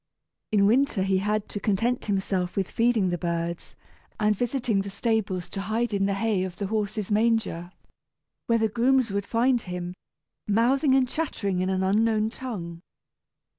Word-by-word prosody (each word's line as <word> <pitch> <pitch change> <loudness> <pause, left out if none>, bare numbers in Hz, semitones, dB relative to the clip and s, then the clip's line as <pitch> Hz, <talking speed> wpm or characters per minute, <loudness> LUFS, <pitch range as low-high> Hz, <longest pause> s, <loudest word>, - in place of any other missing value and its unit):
In 205 -2 +4
winter 235 -2 +3
he 190 -1 +2
had 210 +1 -1
to 205 - -4
content 230 +5 0
himself 190 -3 -1
with 195 -2 -1
feeding 230 -5 +2
the 175 - -2
birds, 170 0 -3 0.4
and 210 0 +3
visiting 240 -2 0
the 200 - -5
stables 200 -4 -1
to 195 - -4
hide 220 +3 -1
in 195 -1 +1
the 200 - 0
hay 205 -2 0
of 185 -2 -5
the 200 - -3
horses' 210 0 -2
manger, 215 -6 +1 0.8
where 230 - +3
the 220 -1 +2
grooms 240 +2 +2
would 200 0 -2
find 240 +1 +2
him, 180 -1 -5 0.5
mouthing 260 +6 +3
and 260 -1 +3
chattering 225 - -2
in 185 +1 0
an 190 0 0
unknown 215 +2 +2
tongue. 175 -11 -6
210 Hz, 165 wpm, -26 LUFS, 190-230 Hz, 0.8 s, In